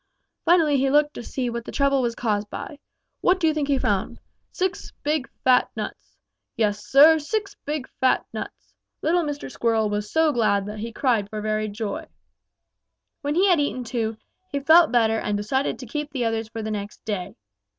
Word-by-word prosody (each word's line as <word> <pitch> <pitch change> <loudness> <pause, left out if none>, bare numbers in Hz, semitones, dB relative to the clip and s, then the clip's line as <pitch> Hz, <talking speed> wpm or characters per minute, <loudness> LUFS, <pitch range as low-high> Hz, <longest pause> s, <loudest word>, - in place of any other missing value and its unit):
Finally 325 -5 +4
he 270 +1 +2
looked 295 +1 +3
to - - -7
see 250 +1 -3
what 235 0 -3
the - - -8
trouble 275 -1 +2
was 235 -2 -1
caused 210 -3 -1
by. 295 - -7 0.4
What 370 +1 +3
do 340 - +1
you 315 - +3
think 300 -2 -1
he 280 -1 +2
found? 200 -6 -1 0.3
Six 375 +1 -2
big, 295 -2 0
fat 255 -1 +4
nuts! - - -7 0.4
Yes, 210 -2 0
Sir, 300 +8 +7
six 405 +6 -3
big, 295 -2 -3
fat 260 -1 +2
nuts! - - -8 0.3
Little 345 +2 +3
Mr. 290 -4 -4
Squirrel 225 -3 +1
was 210 0 -3
so 320 -1 +3
glad 210 -6 +1
that 210 +1 -6
he 230 +2 -5
cried 230 -5 +1
for 215 - -5
very 215 0 -1
joy. 205 -1 -4 1.1
"When 290 0 -1
he 380 +3 +4
had 355 -4 +4
eaten 285 -3 -1
two, 225 -2 -2 0.3
he 285 - -1
felt 320 +3 +6
better 225 -2 +3
and 210 -1 -1
decided 265 +7 -1
to 255 - -8
keep 295 +5 -4
the 260 -4 -2
others 225 -1 -1
for 225 -1 -6
the 220 - -3
next 205 -1 -6
day. 200 -3 -4
250 Hz, 190 wpm, -24 LUFS, 215-295 Hz, 1.1 s, Sir